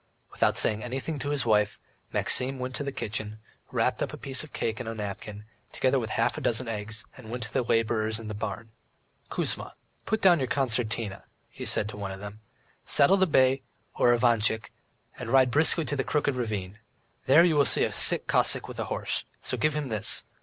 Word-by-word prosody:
Without - - +1
saying 110 0 +2
anything 135 +5 -4
to 145 - -3
his 145 -3 -1
wife, 105 -2 +2 0.3
Maxim 130 +1 +4
went 130 0 -5
into 145 - -4
the 140 - -3
kitchen, 110 -3 -4 0.3
wrapped - - 0
a - - 0
piece 135 0 -2
of 155 - -12
cake 110 -1 -2
up - - -5
in 120 - -7
a 115 - -4
napkin, 105 0 -7 0.3
together - - +1
with - - -4
half - - 0
a - - -10
dozen 120 +1 0
eggs, 110 0 -4
and 120 -4 -12
went 120 0 -4
to 110 - -9
the 130 - +2
labourers 110 -2 0
in 115 - -9
the 105 - -5
barn. 110 +1 -6 0.6
"Kuzma, - - -2 0.3
put 220 - 0
down 180 -5 +5
your 130 - -1
concertina," 115 -6 -2 0.3
he - - -8
said 105 - 0
to 105 - -8
one 100 -1 -5
of 95 - -8
them. 100 +1 -9 0.4
"Saddle 145 +8 +5
the 190 0 +3
bay, 130 -3 +3 0.3
or 120 - +3
Ivantchik, 115 -2 +2 0.5
and 125 - -6
ride 130 0 +4
briskly 155 +3 +4
to 145 - -2
the 135 - -1
Crooked 145 0 0
Ravine. 105 -4 -4 0.5
There 150 +5 +7
you 170 -3 +3
will 145 -1 +4
see 105 - +2
a - - -1
sick - - +4
Cossack - - +2
with - - -9
a - - -2
horse, - - -2 0.2
so - - -3
give 155 0 0
him 150 -3 -3
this. 110 -2 +1
120 Hz, 210 wpm, -27 LUFS, 110-135 Hz, 0.6 s, There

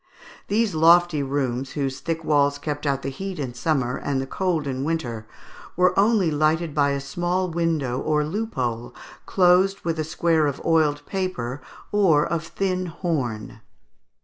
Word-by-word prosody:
These 215 0 +1
lofty 165 0 +5
rooms, 135 -2 -2
whose 135 -2 -2
thick 165 -1 -3
walls 145 -2 +2
kept 145 0 -4
out 140 -1 0
the 135 - -2
heat 190 +7 -6
in 135 -5 -4
summer, 125 -1 0
and 140 -2 -2
the 135 - -2
cold 170 +1 -1
in 135 -1 -3
winter, 120 -9 -3 0.5
were 180 0 +3
only 200 -4 +3
lighted 155 +1 +1
by 145 -2 +2
a 140 0 -1
small 175 +6 -2
window 160 -7 0
or 150 0 +1
loophole, 130 - -3 0.3
closed 185 +1 +3
with 165 -1 -2
a - - +1
square 160 0 +1
of 140 -1 -3
oiled 155 -3 +2
paper 145 -10 -3 0.3
or 180 -8 +4
of 170 -1 -2
thin 185 -1 -2
horn. 140 - -3
155 Hz, 155 wpm, -23 LUFS, 135-175 Hz, 0.5 s, lofty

